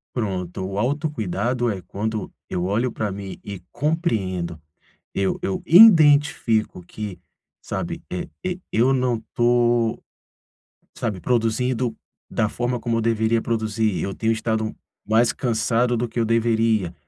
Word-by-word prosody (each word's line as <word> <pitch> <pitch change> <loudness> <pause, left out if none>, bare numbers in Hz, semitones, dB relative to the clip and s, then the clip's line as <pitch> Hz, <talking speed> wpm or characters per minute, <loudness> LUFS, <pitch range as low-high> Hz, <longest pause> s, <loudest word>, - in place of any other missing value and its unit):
Pronto. 95 -5 -3
O 95 - -5
autocuidado 120 - -1
é 95 -3 -5
quando 110 +2 -4 0.2
eu 90 0 -2
olho 115 +6 0
para 105 -3 -3
mim 95 -1 -7
e 100 -2 -7
compreendo, 95 - -1 0.5
eu 95 -1 0
eu 95 - -2
identifico 150 - +6
que, 95 0 -7 0.4
sabe, - - -4
e 90 - -4
e 185 0 -2
eu 125 +4 +3
não 125 -3 0
tô, 120 -1 +2 0.9
sabe, 105 -5 -3
produzindo 120 +3 0 0.3
da 110 - 0
forma 120 +2 -2
como 115 0 -1
eu - - +1
deveria 115 0 +1
produzir. 110 -2 -1
Eu 95 - -3
tenho 115 0 +1
estado 110 -1 -2 0.3
mais 115 +2 +4
cansado 120 0 +1
do 120 +1 0
que 115 +1 -3
eu 115 - +1
deveria, 115 -5 +1
115 Hz, 135 wpm, -23 LUFS, 105-120 Hz, 0.9 s, identifico